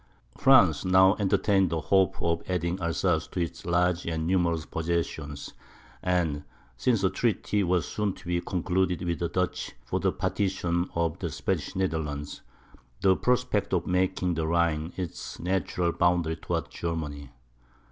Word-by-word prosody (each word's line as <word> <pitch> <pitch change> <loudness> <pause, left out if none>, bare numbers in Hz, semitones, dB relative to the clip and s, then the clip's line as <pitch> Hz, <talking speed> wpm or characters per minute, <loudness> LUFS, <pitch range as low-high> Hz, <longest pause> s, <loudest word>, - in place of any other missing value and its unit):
France 95 - +5
now 95 +1 +6
entertained 95 -1 +2
the 80 -1 -1
hope 95 +4 +2
of 85 0 +1
adding 90 0 -1
Alsace 85 -1 0
to - - -5
its 85 0 -4
large 90 0 +1
and 80 -1 -1
numerous 85 -3 +1
possessions, 80 -3 -3 0.5
and, 85 -5 0 0.3
since 115 - +1
a 95 - +4
treaty 105 -2 0
was 90 -1 +1
soon 105 -2 -1
to - - -16
be 85 0 0
concluded 90 0 0
with 85 -1 -2
the 85 - -1
Dutch 90 +1 -2
for - - -1
the - - +1
partition 90 -3 -1
of 85 -2 0
the - - -2
Spanish - - -3
Netherlands 75 -6 -2 0.6
the 95 -1 +5
prospect 125 -5 0
of 90 - +1
making 90 0 +1
the 80 -1 -1
Rhine 85 -1 +1
its 90 -3 -6
natural 90 -1 0
boundary 85 -2 +1
towards - - -3
Germany. 75 -4 -4
85 Hz, 145 wpm, -27 LUFS, 80-95 Hz, 0.6 s, now